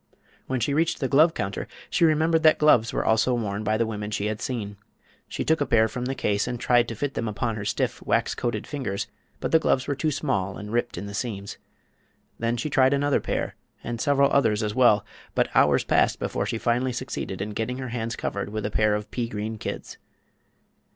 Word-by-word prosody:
When 130 -1 -1
she 130 +5 0
reached 160 +3 +1
the 135 - 0
glove 155 +5 +4
counter 100 -1 -3 0.2
she 170 - +4
remembered 160 +1 +3
that 155 -1 +6
gloves 125 -7 +4
were - - -1
also 115 +3 +3
worn 105 -3 -2
by 110 +1 +1
the 115 - +2
women 105 -2 -4
she 105 -1 -2
had 105 0 -2
seen. 105 -5 -4 0.5
She - - -4
took 160 -1 +2
a - - +3
pair 110 -2 +4
from 125 +2 -5
the 135 +1 -2
case 100 -2 0
and 125 -1 -3
tried 120 -1 +3
to 115 - -5
fit 140 +5 -2
them 115 - -2
upon 110 +2 -2
her 105 -1 -5
stiff, - - -1
wax - - +1
coated 120 - -2
fingers; 130 -9 -3 0.3
but - - -3
the 160 - +6
gloves 130 -4 +1
were 145 - +1
too 150 +3 -1
small 100 -10 -1
and 105 +1 -7
ripped 120 -2 -1
in 95 - -5
the 100 - -7
seams. 100 -2 -4 0.8
Then 115 +1 0
she 120 - -2
tried 135 -1 +4
another 145 0 +1
pair, - - -2 0.3
and 120 0 -4
several 140 -1 +3
others, 110 -6 +3
as 105 -1 -1
well; 110 -4 +4 0.3
but - - +2
hours - - +4
passed - - +2
before - - -2
she - - -2
finally 120 +3 0
succeeded 120 -6 -4
in 105 +2 -3
getting 115 +4 -3
her 130 -1 -5
hands 115 -1 -3
covered 100 -3 -3
with 110 0 -4
a 105 - -2
pair 110 0 +2
of 105 0 -5
pea 120 -2 -2
green 110 +1 -4
kids. - - -6
115 Hz, 220 wpm, -25 LUFS, 105-135 Hz, 0.8 s, that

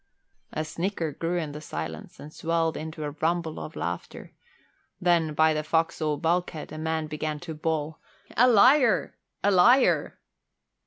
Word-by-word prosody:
A 155 - -3
snicker 170 0 -3
grew 170 +4 -2
in 155 -4 -3
the 150 +1 -8
silence 80 - -7
and 150 +1 -10
swelled 165 -1 0
into 155 0 -6
a 145 - -3
rumble 160 +2 -1
of 155 - -8
laughter; 85 +1 -5 0.7
then, 170 -4 +2
by 160 +1 +4
the 155 0 -2
forecastle 155 -1 0
bulkhead, 165 -1 -1
a 155 - -7
man 160 0 -1
began 155 0 -4
to 165 -2 -6
bawl, 155 0 -2 0.4
"A 245 +3 +6
liar! 245 +1 +5 0.3
A 205 - +4
liar!" 235 +8 +4
160 Hz, 150 wpm, -26 LUFS, 155-175 Hz, 0.7 s, A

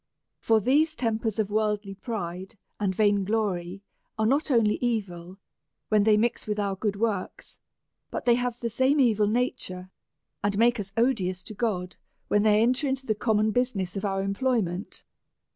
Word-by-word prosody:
For 225 -1 +3
these 300 +8 +2
tempers 225 -4 -1
of 210 -2 -1
worldly 210 -2 0
pride 195 -1 -6 0.2
and 195 -3 0
vain 205 -1 +3
glory 195 -3 -2 0.3
are 220 - +1
not 280 +7 +1
only 225 -5 +3
evil, 190 -7 -3 0.5
when 210 -2 +3
they 215 -1 +5
mix 230 +1 0
with 210 0 -1
our 200 -2 -1
good 205 +1 -2
works, 205 -3 -3 0.5
but - - -5
they 240 - +5
have 245 0 -1
the 235 - -1
same 260 +6 +2
evil 220 -5 +3
nature, 190 -5 -2 0.5
and 200 -1 0
make 235 +1 +3
us 195 -1 -5
odious 195 -7 +1
to 215 - -9
God, 195 -5 -2 0.3
when 205 - +3
they 215 0 +4
enter 255 +4 +2
into 265 0 -2
the 220 - +1
common 215 0 +1
business 210 -6 -1
of 195 - -4
our 195 -1 -1
em 195 0 -1
ployment. 200 -6 -2
215 Hz, 170 wpm, -26 LUFS, 195-235 Hz, 0.5 s, they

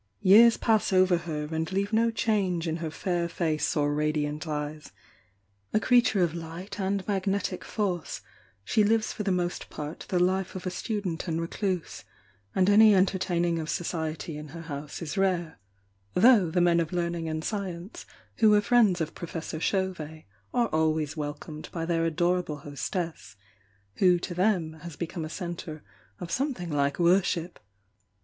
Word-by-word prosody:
Years 225 +5 +7
pass 220 -3 +2
over 185 -1 +5
her 155 -3 -3
and 160 +1 -2
leave 200 +3 -1
no 230 +1 +4
change 200 -7 0
in 160 0 -1
her 165 -1 -4
fair 170 +1 -2
face 155 -4 -1
or 145 0 +2
radiant 150 +1 -1
eyes, 150 0 -4 0.4
— 100 0 -41
a - - +5
creature 240 -5 +4
of 165 -2 0
light 170 +5 -7
and 195 0 -1
magnetic 195 -2 -1
force, 185 -7 -3 0.4
she 215 - +2
lives 220 +1 +2
for - - -5
the 200 -2 0
most 180 -1 -2
part 150 +1 -7
the 185 - +1
life 185 +1 +1
of 185 - -6
a 185 - -1
student 190 -4 -3
and 165 -1 -1
recluse, 180 +1 -3 0.5
and 185 -1 +3
any 210 +1 +7
entertaining 180 -3 +1
of 155 0 -4
society 160 -2 -3
in 150 - -8
her 165 +3 -9
house 150 +1 -6
is 165 +4 -3
rare, 175 -4 0 0.6
though 210 -3 +6
the 175 +2 +1
men 170 -1 +4
of 165 -2 -1
learning 170 -2 -2
ai'd 155 0 -3
science 190 -2 -5 0.3
who 220 -2 +5
were 210 0 +6
friends 205 -5 +3
of 160 0 -2
Professor 165 -2 -6
Chauvet 165 -5 -2 0.3
are 240 -2 +2
always 155 -1 0
welcomed 150 0 -6
by 165 -1 -3
their 165 -1 +1
adorable 175 -1 0
hostess, 160 - -4 0.6
who 180 -2 +5
to 175 +1 -5
them 175 -4 0
has 170 -3 -8
become 170 +1 -4
a 155 - -5
centre 170 -3 -6 0.4
of 175 -2 -6
something 250 - -2
like 140 -1 +1
worship. 175 -1 +2
175 Hz, 165 wpm, -27 LUFS, 160-195 Hz, 0.6 s, Years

